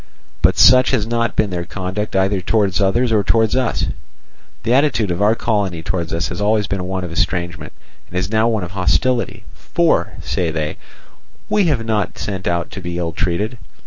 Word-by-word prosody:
"But - - +3
such 130 0 +7
has 120 -6 +1
not 115 -1 -1
been 105 -2 +1
their 90 -1 -2
conduct 95 +3 -4
either 95 0 +2
towards 100 0 +1
others 115 +5 +2
or 105 -2 +3
towards 110 +3 +2
us. 130 -2 0 0.8
The 115 - +1
attitude 130 -8 +2
of 85 +3 -2
our 105 +2 +4
colony 100 -8 -1
towards 85 -1 -2
us 85 +1 -1
has - - -5
always 105 0 +2
been 95 -2 -3
one 95 0 -3
of 90 - -6
estrangement 85 +1 -2 0.4
and 90 - -5
is 90 - 0
now 110 +1 +3
one 110 -4 0
of 85 - -6
hostility; 100 +7 0
for, - - 0
say 90 -3 -1
they: 80 -1 -3 0.7
'We 195 -6 +3
were 115 - -6
not 110 -3 -1
sent 95 -2 -4
out 85 -1 -1
to 95 - -7
be 85 -1 -4
ill 85 -1 -2
treated. 105 +8 -2
100 Hz, 190 wpm, -19 LUFS, 90-110 Hz, 0.8 s, such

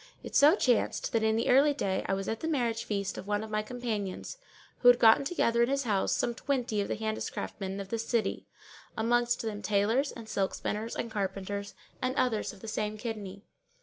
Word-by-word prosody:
It - - -7
so 295 +5 +7
chanced 250 - +1
that 230 - +2
in 220 0 +2
the 230 - 0
early 285 +3 +5
day 195 -8 -1
I 195 - +1
was 195 0 -4
at 225 - -2
the 320 - -3
marriage 235 -7 0
feast 200 -2 -2
of 195 - -9
one 205 +1 0
of 220 - -8
my 215 0 +1
companions, 220 - -4 0.4
who 245 - +3
had 245 0 +9
gotten 225 +2 +6
together 235 -6 +1
in 235 - +3
his 275 0 +1
house 205 -5 +1
some 240 - +1
twenty 245 -4 -1
of 200 - -2
the - - -2
handicraftsmen 215 -2 -4
of 195 -1 -6
this 230 +1 -3
city, 235 -3 -1 0.5
amongst 240 +2 +1
them 210 -2 -4
tailors 220 +8 +1
and 230 -2 -10
silk 195 -3 -1
spinners 220 +2 -3
and 230 - -4
carpenters 200 0 -3 0.3
and 255 +1 -1
others 235 -6 0
of 200 - -15
the - - -8
same 215 0 -2
kidney. 210 -4 -6
220 Hz, 210 wpm, -30 LUFS, 205-240 Hz, 0.5 s, had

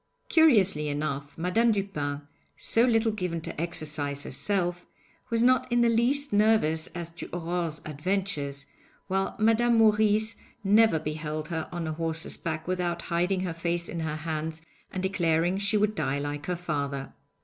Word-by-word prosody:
Curiously 205 - +4
enough, 145 -1 -3
Madame 215 +8 +2
Dupin, 150 -9 -2 0.3
so 230 +2 +3
little 225 -2 +3
given 180 -5 -3
to 155 - -5
exercise 150 -4 -2
herself, 175 +4 -2 0.4
was 230 0 +2
not 255 0 +3
in 240 0 +3
the 235 - +4
least 245 +4 +2
nervous 205 -7 +3
as 170 -1 -5
to 170 - -8
Aurore's 170 -2 -3
adventures, 150 -3 -2 0.4
while 195 0 -1
Madame 225 +2 +3
Maurice 215 0 +3 0.3
never 210 -2 +5
beheld 155 0 -4
her 160 -2 -3
on 175 -1 -3
a 155 - -2
horse's 160 0 -1
back 160 -1 -4
without 175 -2 -1
hiding 180 +2 +1
her 180 -3 -2
face 170 +1 -1
in 170 - -5
her 160 -1 -2
hands 160 0 -4 0.3
and 185 - -4
declaring 175 -1 +1
she 205 +2 +1
would 210 0 +2
die 140 -8 -1
like 145 +1 -4
her 180 - 0
father. 140 -5 -3
175 Hz, 155 wpm, -27 LUFS, 155-210 Hz, 0.4 s, never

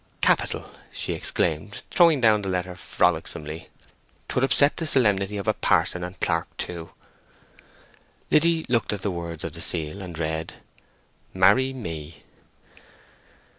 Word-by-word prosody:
"Capital!" - - +2 0.2
she - - -2
exclaimed, - - -2
throwing 170 -5 +5
down 110 -4 +4
the 95 - -4
letter 90 -1 -2
frolicsomely. 80 -3 -1 0.6
"'Twould 130 - 0
upset 140 +2 +4
the 165 - -2
solemnity 105 -7 +2
of 100 - -5
a - - +4
parson 90 - +1
and 90 +1 -7
clerke 85 0 0
too." 85 -2 -5 1.4
Liddy 165 +1 +3
looked 120 -3 +1
at 100 -2 -5
the 100 - 0
words 85 -2 -5
of - - -5
the - - -7
seal, 85 +3 -3
and 90 -4 -7
read— 80 0 -3 0.8
"MARRY 105 +8 +5
ME." 80 - -7
95 Hz, 135 wpm, -25 LUFS, 85-125 Hz, 1.4 s, throwing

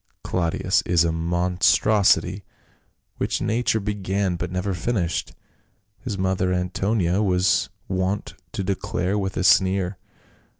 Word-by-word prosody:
" - - -50
Claudius 85 -2 0
is 85 -2 +2
a 85 - +1
monstrosity, 90 +3 +2 0.7
which - - -1
nature 110 +1 0
began 100 -2 -1
but 90 +1 -4
never 90 +2 -2
finished," 90 -1 -2 0.6
his 115 -7 -5
mother 95 -1 0
Antonia 90 +1 0
was 90 -2 +2 0.2
wont 95 +2 -2 0.2
to 100 - -3
declare 95 0 -2
with 95 -2 -2
a - - 0
sneer. 95 -1 +3
95 Hz, 120 wpm, -23 LUFS, 90-100 Hz, 0.7 s, sneer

